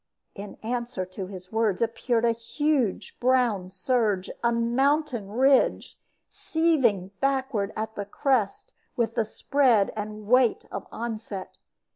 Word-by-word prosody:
In 200 0 -8
answer 235 -4 -3
to 185 +1 -7
his 185 -1 -10
words 220 -4 +1
appeared 230 0 0
a 230 - +4
huge 250 0 -1
brown 240 -7 +2
surge, 205 -1 0
a 235 - +3
mountain 240 0 +1
ridge, 265 +5 +2 0.3
seething 265 - +1
backward 265 -7 0
at 220 0 -3
the 205 -2 -5
crest 230 -1 -1 0.2
with 230 -2 0
the 225 - +1
spread 240 -2 +2
and 210 0 -6
weight 250 +1 +3
of - - -6
onset. 220 -4 -6
230 Hz, 125 wpm, -26 LUFS, 205-255 Hz, 0.3 s, a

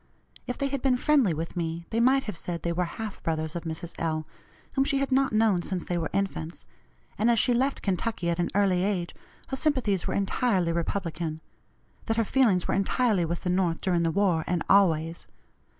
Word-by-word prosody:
If 250 - -3
they 275 - 0
had 275 -1 -2
been 255 -2 +2
friendly 275 - +3
with 165 +3 -4
me 170 -1 -3
they 225 - +1
might 265 +3 +4
have 210 - -5
said 170 0 -5
they 170 - 0
were 180 +1 0
half 215 +4 -6
brothers 160 -1 -2
of 170 - -5
Mrs. 165 +1 -5
L., 155 -1 -1 0.5
whom 270 - +3
she 275 0 0
had 275 0 -1
not 270 +1 +3
known 215 -4 +3
since 180 0 -4
they 175 - -2
were 165 -2 -1
infants; 190 -4 -3 0.5
and 220 +3 +3
as 235 - +4
she 245 - +4
left 265 +3 0
Kentucky 195 -1 -1
at 170 - -2
an 175 - +1
early 190 -3 +3
age 190 -4 -1 0.4
her 265 - -2
sympathies 255 - 0
were - - -1
entirely 195 -3 +1
Republican 165 -2 -2 0.7
that 225 -1 0
her 230 - +3
feelings 215 -6 +2
were - - 0
entirely 195 -1 +2
with 170 +1 -3
the 180 - -1
North 180 -3 +1
during 175 -3 +1
the 165 - +2
war, 180 -3 +2
and 175 -2 0
always. 165 -4 +3
190 Hz, 205 wpm, -27 LUFS, 170-230 Hz, 0.7 s, might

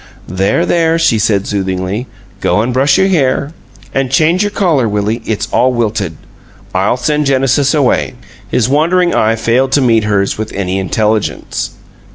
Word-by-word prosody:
"There, 95 - 0
there," 165 -1 +2
she 165 -9 +2
said, 100 -2 +1
soothingly. 95 +3 -3 0.3
"Go 105 - +1
and 125 +2 -2
brush 135 +2 +3
your 190 - +3
hair. 140 -3 0 0.4
And 135 -1 0
change 160 +7 +2
your 205 - +1
collar, 165 - +1
Willie; 105 +3 -1
it's 110 - -2
all 125 +1 +3
wilted. 105 -8 -2 0.6
I'll 95 +6 +1
send 150 +4 0
Genesis 135 +2 +2
away." 135 -3 +1 0.3
His 120 - +1
wandering 170 +6 +2
eye 110 +1 +2
failed 120 +4 +1
to 145 - +3
meet 115 -4 +2
hers 100 -1 0
with 110 0 -4
any 95 -1 -2
intelligence. 105 +2 -2
125 Hz, 160 wpm, -13 LUFS, 105-145 Hz, 0.6 s, brush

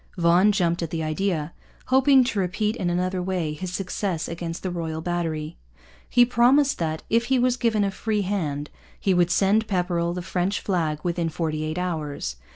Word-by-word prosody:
Vaughan 175 +4 +4
jumped 175 -4 +1
at 165 - -2
the 160 0 -3
idea, 155 0 -1 0.4
hoping 265 0 +6
to 240 -4 -1
repeat 210 +4 0
in 180 -7 -1
another 180 +1 -1
way 180 -4 -2
his 180 +4 -5
success 185 -2 -2
against 165 0 -5
the 185 - -2
Royal 165 -2 -3
Battery. 160 -2 -3 0.5
He 245 0 +5
promised 255 +4 +3
that, 160 -2 -2
if 230 +1 +2
he 260 +1 +2
was 250 0 +2
given 230 -4 +1
a 200 - 0
free 210 +1 -1
hand, 150 -7 -2 0.3
he 195 - +2
would 175 -1 +3
send 200 +4 +2
Pepperrell 175 -3 0
the 180 - -4
French 185 +2 -1
flag 165 -6 -1
within 170 -1 -1
forty 155 -2 -2
eight 155 +2 -3
hours. 150 - -3
180 Hz, 180 wpm, -24 LUFS, 165-205 Hz, 0.5 s, hoping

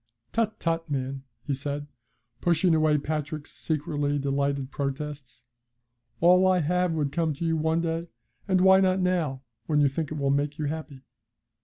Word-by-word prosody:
Tut, 225 -1 0
tut, 165 -1 -1
man!' 135 -1 -3 0.2
he 145 - -2
said, 145 +2 -4 0.6
pushing 175 0 +3
away 155 -1 +3
Patrick's 150 0 -4
secretly 145 -2 -1
delighted 140 -1 -1
protests, 140 -3 -5 0.8
'all 180 +2 +6
I 185 -1 +4
have 180 +1 +1
would 150 -3 -1
come 160 -1 0
to 170 - -4
you 165 0 +1
one 160 +1 +1
day, 165 0 -2 0.4
and 185 -2 +3
why 190 0 +7
not 190 0 +3
now, 170 -8 0 0.2
when 150 -2 +2
you 145 - +5
think 145 +2 -3
it 155 - -3
will 140 -1 +1
make 145 +1 0
you 155 - -2
happy?' 145 -3 -5
150 Hz, 165 wpm, -27 LUFS, 140-170 Hz, 0.8 s, why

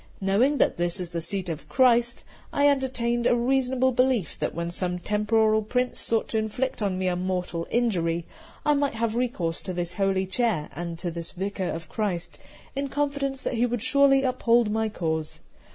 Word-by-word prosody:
Knowing 215 +9 +2
that - - +2
this 175 0 0
is 175 -2 -5
the 170 -1 -3
seat 190 +2 -3
of 165 -2 -6
Christ, 240 -2 +3 0.3
I 285 0 +3
entertained 245 -4 +1
the 245 - +4
reasonable 260 +1 +2
belief 250 -6 +1
that - - -2
when 170 +1 -3
some 180 0 -1
temporal 215 +3 +2
prince 250 +4 -1
sought 225 -1 +1
to 220 - 0
inflict 245 +4 -2
on 195 -3 0
me 185 - -2
a 180 - +1
mortal 180 -2 -2
injury, 170 -8 0 0.4
I 295 - +4
might 285 -3 0
have 225 0 -1
recourse 210 -10 -1
to 185 - -5
this 175 0 -3
holy 195 -1 +1
chair 190 -5 0
and 170 +1 -5
to 175 0 -4
this 170 0 -5
Vicar 190 0 -3
of 165 -1 -5
Christ, 175 -5 -3 0.4
in 275 +1 -1
confidence 280 -1 -1
that - - -2
he 240 +1 +2
would 240 -2 -2
surely 275 +1 +4
uphold 240 -3 +2
my 220 0 0
cause. 160 -5 -3
220 Hz, 185 wpm, -26 LUFS, 180-250 Hz, 0.4 s, the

